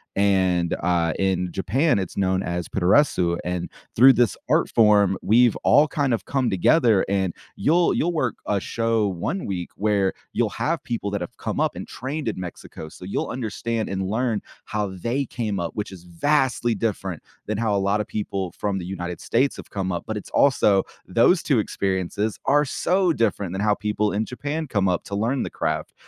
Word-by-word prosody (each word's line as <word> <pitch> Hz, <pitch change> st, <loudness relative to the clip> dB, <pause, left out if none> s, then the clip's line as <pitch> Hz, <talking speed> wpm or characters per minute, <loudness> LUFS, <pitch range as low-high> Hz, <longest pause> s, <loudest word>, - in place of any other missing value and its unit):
and, 95 Hz, -4 st, +2 dB
uh, 85 Hz, -2 st, +1 dB
in 90 Hz, -2 st, 0 dB
Japan, 115 Hz, -, +1 dB
it's 95 Hz, -3 st, -5 dB
known 95 Hz, -1 st, +1 dB
as 85 Hz, -2 st, -3 dB
puroresu, 90 Hz, -3 st, +2 dB
and 90 Hz, -1 st, -3 dB, 0.3 s
through 130 Hz, +4 st, +8 dB
this 120 Hz, -4 st, +2 dB
art -, -, +3 dB
form, 105 Hz, -4 st, +4 dB
we've 120 Hz, +1 st, +4 dB
all 145 Hz, +5 st, +4 dB
kind 145 Hz, -5 st, 0 dB
of 110 Hz, -5 st, -2 dB
come 130 Hz, -3 st, 0 dB
together, 110 Hz, -, +3 dB
and 95 Hz, -3 st, 0 dB, 0.2 s
you'll 170 Hz, +3 st, +3 dB
you'll 175 Hz, +2 st, 0 dB
work 130 Hz, -8 st, 0 dB
a 105 Hz, -1 st, +1 dB
show 115 Hz, 0 st, 0 dB
1 115 Hz, -, -3 dB
week 90 Hz, -3 st, -4 dB
where 100 Hz, -2 st, +1 dB, 0.2 s
you'll -, -, 0 dB
have -, -, -2 dB
people 115 Hz, -4 st, -3 dB
that 100 Hz, -1 st, -2 dB
have 90 Hz, -, -6 dB
come -, -, -3 dB
up -, -, +1 dB
and -, -, -7 dB
trained 140 Hz, +2 st, -5 dB
in 105 Hz, -, -5 dB
Mexico, 90 Hz, -3 st, -8 dB
so 80 Hz, -, -13 dB
you'll 95 Hz, -, -2 dB
understand 115 Hz, -1 st, -3 dB
and 95 Hz, -1 st, -2 dB
learn 115 Hz, 0 st, 0 dB, 0.2 s
how 105 Hz, -1 st, -2 dB, 0.2 s
they 135 Hz, +4 st, 0 dB
came 110 Hz, -5 st, -3 dB
up, 85 Hz, -1 st, -3 dB
which 105 Hz, -1 st, -4 dB
is 90 Hz, -3 st, -11 dB
vastly 120 Hz, -, +1 dB
different 95 Hz, -6 st, -3 dB, 0.3 s
than 105 Hz, 0 st, -2 dB
how 110 Hz, -2 st, +1 dB
a -, -, +2 dB
lot 100 Hz, +2 st, +1 dB
of 105 Hz, -, -3 dB
people 100 Hz, -4 st, -3 dB
from 100 Hz, -2 st, -1 dB
the 90 Hz, -, -5 dB
United 90 Hz, -2 st, -5 dB
States 130 Hz, +4 st, +1 dB
have -, -, -10 dB
come 95 Hz, -2 st, -3 dB
up, 85 Hz, -, -3 dB
but 110 Hz, -, -3 dB
it's 105 Hz, -, -8 dB
also 105 Hz, -8 st, +3 dB, 0.2 s
those 120 Hz, -, +4 dB
2 135 Hz, -6 st, +2 dB
experiences 100 Hz, +1 st, -2 dB
are 145 Hz, +1 st, +4 dB
so 180 Hz, +6 st, +1 dB
different 105 Hz, -, 0 dB
than 95 Hz, -, -3 dB
how 105 Hz, 0 st, +3 dB
people 105 Hz, 0 st, -1 dB
in 105 Hz, +2 st, 0 dB
Japan 145 Hz, +6 st, -4 dB
come 100 Hz, -6 st, +1 dB
up 90 Hz, -1 st, 0 dB
to 100 Hz, -, -5 dB
learn 115 Hz, +6 st, 0 dB
the -, -, -4 dB
craft. -, -, -3 dB
105 Hz, 195 wpm, -23 LUFS, 95-120 Hz, 0.3 s, through